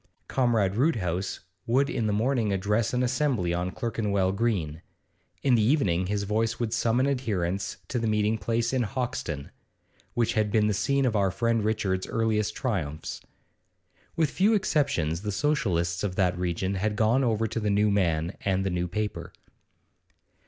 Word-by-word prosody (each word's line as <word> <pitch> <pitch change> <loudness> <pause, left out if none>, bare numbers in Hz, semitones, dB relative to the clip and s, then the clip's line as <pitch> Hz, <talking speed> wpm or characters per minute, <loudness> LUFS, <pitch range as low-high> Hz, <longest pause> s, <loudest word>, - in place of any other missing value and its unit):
Comrade 110 -6 +1
Roodhouse 95 - 0 0.3
would 130 +4 +3
in 120 -6 -1
the - - +1
morning 115 0 +1
address 105 +3 +1
an 125 0 +1
assembly 125 -8 +1
on 90 +1 -1
Clerkenwell 100 -3 -1
Green; 95 -8 -1 0.6
in 135 - +3
the 115 - +4
evening 100 - +2
his 100 +1 -1
voice 110 +3 0
would 115 -2 -1
summon 120 +3 +2
adherents 100 -9 -1
to 125 - -2
the 115 - -1
meeting 105 +1 +1
place 115 +2 0
in 130 - +2
Hoxton 110 - -3 0.6
which 120 -2 +1
had 110 -1 +1
been 105 0 +3
the 105 - +2
scene 140 +7 +1
of 120 -4 +1
our 100 -2 +3
friend 115 +3 0
Richard's 100 -4 0
earliest 110 -2 0
triumphs. 85 - -3 0.9
With 160 -3 +1
few 210 +4 +3
exceptions 90 - 0
the 105 0 -3
Socialists 95 - 0
of 95 -3 -2
that 90 -2 +2
region 90 +2 -1
had 105 +2 -1
gone 115 +5 +3
over 115 -2 +1
to 110 - -2
the 105 -1 -1
new 105 +1 +3
man 85 -3 +1
and 95 -1 +1
the 95 - 0
new 90 0 -1
paper. 105 +3 -4
105 Hz, 165 wpm, -27 LUFS, 95-120 Hz, 0.9 s, the